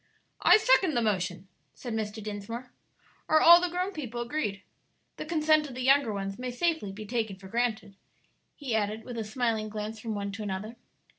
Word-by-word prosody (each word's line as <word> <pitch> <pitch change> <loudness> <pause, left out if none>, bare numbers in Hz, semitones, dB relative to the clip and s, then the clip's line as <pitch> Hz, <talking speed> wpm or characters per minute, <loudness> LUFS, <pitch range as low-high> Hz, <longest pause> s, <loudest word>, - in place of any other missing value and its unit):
"I - - +7
second 405 -8 +3
the 240 - +2
motion," 185 -3 -1 0.3
said 240 - -6
Mr. 215 -1 -4
Dinsmore. 215 +4 -6 0.6
"Are 315 - +6
all 340 +2 +9
the 360 - 0
grown 360 +3 -2
people 245 - -5
agreed? 235 -6 -3 0.5
The - - -6
consent 310 -2 +3
of 250 - -9
the 255 - -4
younger 270 -2 +4
ones 195 +1 -4
may 250 0 -3
safely 285 - -1
be 210 +2 -8
taken 220 -2 -2
for 190 0 -13
granted," 225 -2 -2 0.6
he 270 -6 -4
added, 215 0 -1
with 240 -2 -6
a - - -2
smiling 220 -1 -1
glance 215 +1 -5
from 220 -1 -4
one 200 0 -3
to 200 +2 -7
another. 210 +3 -4
225 Hz, 190 wpm, -28 LUFS, 210-275 Hz, 0.6 s, all